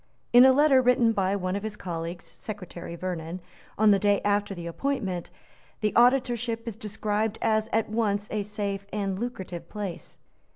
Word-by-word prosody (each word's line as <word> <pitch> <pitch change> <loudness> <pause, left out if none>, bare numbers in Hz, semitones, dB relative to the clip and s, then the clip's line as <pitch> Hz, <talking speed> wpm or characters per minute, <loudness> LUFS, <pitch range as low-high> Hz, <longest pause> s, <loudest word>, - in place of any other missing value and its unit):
In 245 +1 +9
a 265 - +8
letter 275 -1 +5
written 245 -2 +4
by 195 -2 +1
one 185 -1 -2
of 200 - -2
his 215 0 -4
colleagues, 170 -2 -5
Secretary 180 -5 -8
Vernon, 175 -1 -4 0.4
on 215 0 +5
the 200 - +4
day 205 -1 +3
after 205 -1 +1
the 170 -1 -7
appointment, 190 -2 -2 0.5
the 210 -1 0
Auditorship 240 -2 +2
is 225 - -4
described 210 0 -2
as 220 0 +1
at 225 -1 +1
once 210 -2 0
a 215 - 0
safe 200 -1 -4
and 195 -2 -2
lucrative 190 -7 -5
place. 195 -6 -6
205 Hz, 165 wpm, -27 LUFS, 190-225 Hz, 0.5 s, In